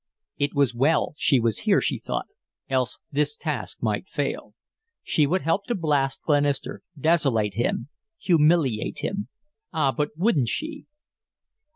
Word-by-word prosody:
It 145 +1 0
was 140 -3 +3
well 145 +8 +2
she 135 -3 +3
was 115 -2 0
here, - - +3
she - - -1
thought, - - -3 0.4
else 130 -2 0
this 150 +1 0
task - - -4
might - - -1
fail. - - -3 0.5
She 150 -2 +2
would 185 +5 0
help 180 +5 +1
to 240 - -1
blast 145 -6 0
Glenister, 145 -2 +1 0.2
desolate 135 -10 +2
him, 120 +3 -1 0.3
humiliate 155 - +2
him. 200 +1 -2 0.4
Ah, 140 -4 +2
but 150 +2 -1
wouldn't 165 - +2
she! 310 -1 -4
145 Hz, 140 wpm, -25 LUFS, 135-165 Hz, 0.5 s, was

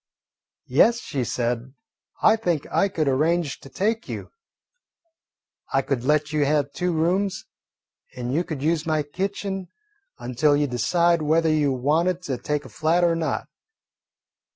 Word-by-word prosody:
"Yes," 235 0 +4
she 140 - -3
said, 120 +2 -2 0.5
"I 220 - +7
think 175 -9 -1
I 200 - +2
could 160 -6 -1
arrange 155 +3 +1
to 135 - -13
take 220 - -1
you. - - -6 1.4
I 135 - +3
could 130 -3 -2
let 150 +2 +1
you 150 -1 +2
have 145 -1 +1
two 180 +4 -1
rooms, 180 +4 0 0.7
and 125 0 -4
you 165 +4 +1
could 150 -5 -5
use 165 +1 0
my 155 -1 +1
kitchen 195 +4 -4 0.5
until 130 +4 +1
you 145 - +2
decided 170 +7 +2
whether 160 +2 +2
you 150 -2 +2
wanted 160 +8 +1
to 130 -7 -3
take 150 +3 -2
a - - -10
flat 165 +3 +1
or 170 -1 +3
not. 165 -1 -2
155 Hz, 150 wpm, -24 LUFS, 140-175 Hz, 1.4 s, I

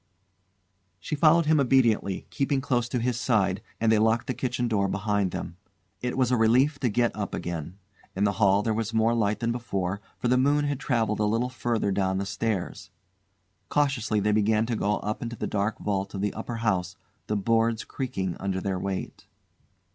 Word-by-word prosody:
She 100 - -6
followed 160 +2 +5
him 155 0 +4
obediently, 120 -7 +2
keeping 140 0 0
close 120 -3 0
to 125 - -1
his 120 0 -1
side, 100 -7 +1 0.2
and 115 0 +3
they 110 - +4
locked 110 +1 +2
the 130 - -2
kitchen 125 -1 -2
door 100 -4 +1
behind 100 0 0
them. 85 0 -6 0.4
It 125 +1 -2
was 130 -2 +2
a - - +4
relief 125 +6 +3
to 125 - +1
get 120 +2 +1
up 100 -3 -3
again. 85 +1 -5 0.4
In 95 - 0
the 100 - +3
hall 100 0 +4
there 110 - 0
was 115 +1 -2
more 110 +1 +3
light 110 -1 0
than 115 0 +1
before, 100 -5 -3 0.2
for - - -2
the 125 +1 +3
moon 145 +2 +3
had 145 -2 -2
travelled 115 -6 0
a 105 - +2
little 115 +4 +1
further 120 -4 -1
down 95 -1 0
the 100 - -2
stairs. 100 -1 -3 0.8
Cautiously 135 -7 +1
they 105 +1 +1
began 110 +1 +2
to 115 0 -2
go 105 -1 0
up 105 +1 -3
into 120 0 -4
the - - -4
dark 105 +1 -1
vault 100 -1 -2
of 95 - -3
the 105 -1 -1
upper 115 +2 -5
house, 95 -6 -1 0.3
the 105 - 0
boards 115 +2 +1
creaking 95 - -3
under 95 -1 -2
their 95 -1 -2
weight. 95 0 -5
110 Hz, 195 wpm, -26 LUFS, 100-125 Hz, 0.8 s, followed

